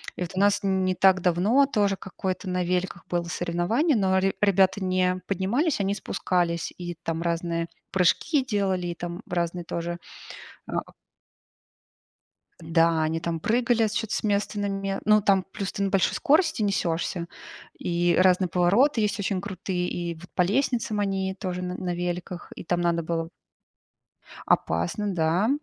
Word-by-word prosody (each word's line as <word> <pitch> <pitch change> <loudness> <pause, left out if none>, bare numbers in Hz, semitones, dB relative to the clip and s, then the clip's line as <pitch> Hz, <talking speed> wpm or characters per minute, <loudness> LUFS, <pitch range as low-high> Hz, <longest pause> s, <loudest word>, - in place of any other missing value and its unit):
И - - -8
вот 175 -1 -3
у - - -1
нас 205 +1 +4
не 190 -1 +1
так 190 +1 +4
давно 185 +11 +3
тоже 205 -7 +1
какое-то 190 0 -5
на 180 0 0
великах 180 0 -2
было 175 -1 -1
соревнование, 175 - 0
но 190 -1 +2
ре 195 +1 +1
ребята 195 -1 +3
не 185 0 +1
поднимались, 215 - 0
они 200 0 0
спускались, 175 -4 -1
и 175 -1 -5
там 165 0 -2
разные 170 0 -1 0.2
прыжки 255 - +2
делали, 195 -6 0
и 175 - -3
там 175 +1 -6
разные 175 0 -2
тоже. 170 +1 -4 0.7
А. - - -1 1.8
Да, 165 0 +2
они 160 +1 0
там 165 0 -3
прыгали 235 +3 +2
с 210 - -2
чё-то 220 -2 -1
с - - -2
места 205 0 0
на 205 - 0
место. 195 0 -3
Ну, 210 0 +5
там 195 -2 +3
плюс 200 -2 -4
ты 200 - -2
на 195 - +1
большой 195 -2 +2
скорости 310 - +2
несешься, 170 -3 -1 0.5
и 175 0 +1
разные 185 0 +4
повороты 200 - +3
есть 210 0 0
очень 195 -1 -1
крутые, 185 -2 -3
и 170 -1 -3
вот 160 +2 -12
по 180 - +2
лестницам 225 +1 0
они 190 -1 -1
тоже 180 -2 -4
н 180 0 -4
на 180 -1 -2
великах, 175 0 -4
и - - -8
там 175 0 0
надо 170 -1 +1
было 165 0 -2 1.2
Опасно, 85 - 0
да. 175 +6 +2
185 Hz, 160 wpm, -26 LUFS, 175-200 Hz, 1.8 s, Ну